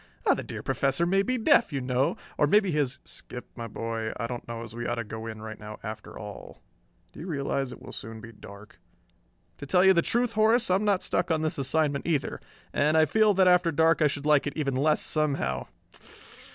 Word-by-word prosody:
The - - +3
dear - - -7
Professor 140 +5 +1
may 195 +3 +3
be 255 +6 -1
deaf, 220 - +4
you 140 - -2
know, 130 +1 0 0.2
or 145 - +3
maybe 200 +2 +3
he's 140 -4 0
" - - -43
"Skip, 125 0 -9
my 115 -2 -6
boy, 115 0 -4
I 115 - -3
don't 120 0 -6
know 115 0 -5
as 115 - -10
we 120 0 -4
ought 120 - -1
to 115 - -3
go 110 +1 -7
in 110 -1 -7
right 110 -1 -8
now 105 0 -8
after 110 -1 -7
all. 105 -1 -10 0.5
Do - - -12
you 170 - -7
realize 140 -4 -2
it - - -10
will - - -9
soon 110 +1 -7
be 115 +1 -10
dark?" 100 -4 -14 0.8
"To 145 - -8
tell 180 +5 +4
you 190 - +7
the 170 - +3
truth, 240 +5 0
Horace, 220 0 +3
I'm 195 +3 +2
not 200 -3 +2
stuck 180 - 0
on 160 -1 +1
this 155 -2 -1
assignment 145 +1 0
either. 150 -5 -1 0.3
And 150 +2 +2
I 160 - +6
feel 215 +6 +3
that 190 -1 +4
after 180 -1 +4
dark 160 +2 +3
I 150 - +6
should 145 0 -4
like 150 -2 +3
it 145 - -3
even 140 -4 -1
less, 150 +3 +2
somehow. 140 - -1
145 Hz, 225 wpm, -27 LUFS, 115-170 Hz, 0.8 s, you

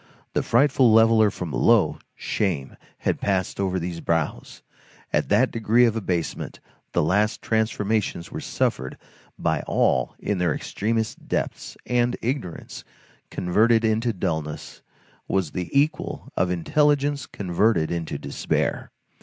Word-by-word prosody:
The - - +1
frightful 130 -1 +4
leveller 110 -1 +6
from 90 -4 -6
below, - - +3 0.2
shame, 85 -10 -2 0.2
had - - -1
passed 95 -2 -1
over 95 -1 0
these 85 -1 -4
brows; 80 -2 -2 0.5
at - - +1
that - - +3
degree 115 +2 +3
of 115 -2 +1
abasement, 90 -7 -3 0.3
the - - +2
last 105 +7 +1
transformations 110 -4 -1
were - - -5
suffered 65 +1 -2 0.4
by - - 0
all 65 -1 +1
in 100 -3 -2
their 85 -4 +1
extremest 110 +1 -2
depths, - - -3
and 120 0 +1
ignorance, 120 - -4 0.5
converted 110 +6 +2
into 110 +2 +1
dulness, 80 -6 -4 0.5
was 95 -6 0
the 90 -2 -4
equal 145 +3 0
of 90 - +1
intelligence 145 - +1
converted 90 -2 +1
into 85 -2 -3
despair. - - -2
105 Hz, 125 wpm, -24 LUFS, 85-115 Hz, 0.5 s, leveller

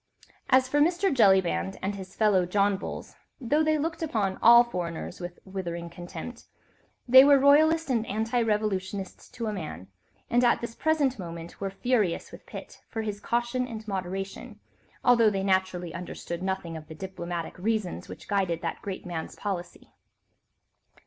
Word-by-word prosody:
As 260 0 +5
for 290 +3 +1
Mr. 345 +4 +3
Jellyband 190 - +3
and 195 +2 -2
his 190 -1 -9
fellow 200 -5 +3
John 200 +2 +2
Bulls, 190 - -7 0.2
though 290 +5 +2
they 310 0 +2
looked 325 +3 -3
upon 210 -11 -1
all 235 +1 +9
foreigners 175 -6 -5
with 175 -1 -7
withering 170 -3 -5
contempt, 180 +8 -8 0.6
they 260 +2 +10
were 285 0 +7
royalist 310 +4 +5
and 230 -3 +2
anti 225 +4 0
revolutionists 205 -3 -2
to 235 -2 -5
a 215 - -2
man, 150 - -7 0.4
and 245 +1 +2
at 240 - +4
this 235 -1 -5
present 285 -4 +1
moment 170 -1 -8
were 195 - -1
furious 210 -3 0
with - - -13
Pitt - - -10
for 225 - -3
his 210 -2 -4
caution 240 +3 -1
and 220 -2 -8
moderation, 195 0 -5 0.4
although 235 -3 +5
they 195 -2 -2
naturally 185 -3 0
understood 170 0 -6
nothing 190 -3 -3
of 155 -1 -9
the 160 - -9
diplomatic 175 -2 -5
reasons 215 -2 -2
which - - -10
guided 190 -5 0
that 165 - -3
great 195 -2 -6
man's 170 -3 -5
policy. 190 -4 -6
200 Hz, 160 wpm, -27 LUFS, 180-240 Hz, 0.6 s, they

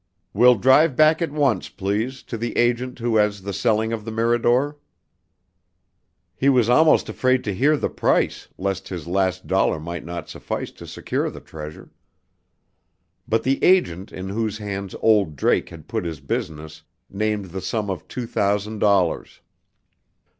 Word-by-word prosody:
"We'll 125 +4 +6
drive 130 +6 +4
back 155 +3 +4
at 165 -3 -1
once, 140 -5 0
please, 110 +7 -3
to - - -6
the 115 +1 -4
agent 120 +1 +1
who 115 -2 0
has 105 -2 +1
the 100 0 -4
selling 110 +2 +1
of 110 -2 -4
the 115 - -6
Mirador." 120 +5 +1 1.6
He 135 +9 +2
was 125 -4 +3
almost 155 +6 +5
afraid 130 0 +1
to 105 - -2
hear 145 +9 +3
the - - -1
price, - - 0
lest 95 0 -3
his 90 -5 -6
last 95 +1 0
dollar 95 -4 +1
might 85 +1 -6
not 85 -1 -6
suffice - - -5
to - - -12
secure - - -2
the - - -10
treasure. 75 -1 -10 1.4
But 115 0 +1
the 135 +1 0
agent 100 - +3
in 95 +1 -6
whose 110 +1 -2
hands 100 -2 -5
"old 105 -8 +3
Drake" 65 - +1
had - - -12
put - - -2
his 80 -4 -5
business 75 +2 -5 0.3
named 105 -2 -2
the 95 +2 -5
sum 105 +1 -2
of 90 -4 -6
two 125 - -5
thousand 105 0 -1
dollars. 100 -5 +1
105 Hz, 160 wpm, -22 LUFS, 95-125 Hz, 1.6 s, We'll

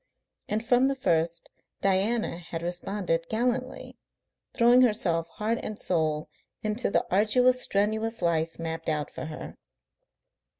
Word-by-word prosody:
And 220 +2 -1
from 245 +2 +4
the 275 - 0
first 170 -7 0 0.3
Diana 195 +1 +1
had 165 -1 -6
responded 175 -1 -2
gallantly, 250 +3 -2 0.6
throwing 240 +1 +6
herself 180 -9 +2
heart 225 +2 -1
and 215 - -5
soul 155 -3 0 0.4
into 215 +3 -1
the - - +1
arduous, 250 +6 +3
strenuous 220 +2 0
life 165 -1 0
mapped 165 0 -4
out 150 -2 -2
for - - -6
her. 155 0 -7
200 Hz, 125 wpm, -27 LUFS, 165-235 Hz, 0.6 s, throwing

